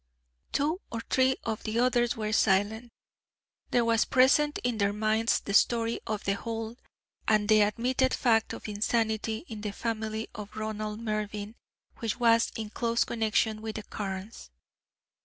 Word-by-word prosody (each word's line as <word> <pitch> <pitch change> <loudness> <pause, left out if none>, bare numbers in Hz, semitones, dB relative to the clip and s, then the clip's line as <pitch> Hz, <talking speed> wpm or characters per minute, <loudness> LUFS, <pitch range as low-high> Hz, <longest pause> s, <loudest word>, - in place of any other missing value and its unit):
Two 310 +7 0
or 230 - -3
three 260 0 +4
of 220 -1 -3
the 220 0 -3
others 240 -1 +2
were 215 -1 -2
silent. 220 +3 +2 0.8
There 240 -1 +2
was 230 -1 +3
present 275 +3 +4
in 240 -2 -1
their 200 0 +2
minds 220 +2 +1
the 200 - -5
story 230 +2 +3
of 215 -1 -2
The 195 - +1
Hold, 225 +2 -5 0.5
and 210 -1 +3
the 215 0 +6
admitted 250 +5 +1
fact 225 -3 +2
of - - -7
insanity 220 +3 -1
in 220 -2 -7
the 210 - -3
family 220 0 -3
of 210 0 -9
Ronald 215 0 -4
Mervyn, 215 -1 -3 0.5
which 225 0 -2
was 230 -1 +4
in 220 -2 -5
close 235 0 +1
connection 220 -1 0
with 220 -1 -5
the 215 - -5
Carnes. 195 - -6
220 Hz, 155 wpm, -29 LUFS, 215-235 Hz, 0.8 s, the